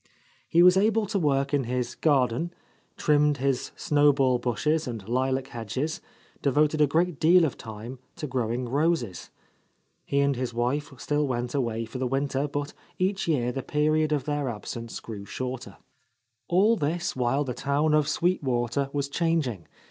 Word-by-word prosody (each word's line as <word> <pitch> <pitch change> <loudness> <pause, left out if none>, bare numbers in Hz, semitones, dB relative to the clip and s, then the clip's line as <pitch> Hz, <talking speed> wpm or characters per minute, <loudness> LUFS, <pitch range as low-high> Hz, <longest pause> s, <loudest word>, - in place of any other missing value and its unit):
He 170 +1 +5
was 180 +1 +7
able 215 +2 +3
to 200 0 -1
work 140 -3 +1
in 140 -3 +2
his 125 0 -2
garden, 145 +3 +1 0.4
trimmed 150 -1 +3
his 135 -1 -1
snowball 140 -4 +3
bushes 135 +7 0
and 110 -5 -6
lilac 130 +2 0
hedges, 120 +7 -3 0.4
devoted 150 +2 +2
a 150 - +6
great 165 +1 +1
deal 170 +2 +6
of 145 - -2
time 115 +3 -8 0.2
to - - -5
growing 125 -2 -2
roses. 140 - 0 0.7
He 140 - 0
and 140 -1 +2
his 125 -1 -3
wife 130 +5 -1
still 150 +2 0
went 120 -1 -2
away 115 -4 -1
for 120 +3 -7
the 130 - 0
winter, 135 +2 -1
but 145 0 -4 0.2
each 190 +1 0
year 125 -7 +1
the 135 - -4
period 155 +3 +1
of 150 -3 +1
their 145 -3 -1
absence 115 +1 -6
grew 105 -3 -8
shorter. 130 +4 -6 0.7
All 200 +6 +4
this 170 0 -2
while 130 +3 +1
the 130 -3 -4
town 145 +4 +1
of 150 -2 +3
Sweet 180 +2 +1
Water 130 +1 -1
was 140 -1 -1
changing. 140 - -1
140 Hz, 165 wpm, -26 LUFS, 125-155 Hz, 0.7 s, was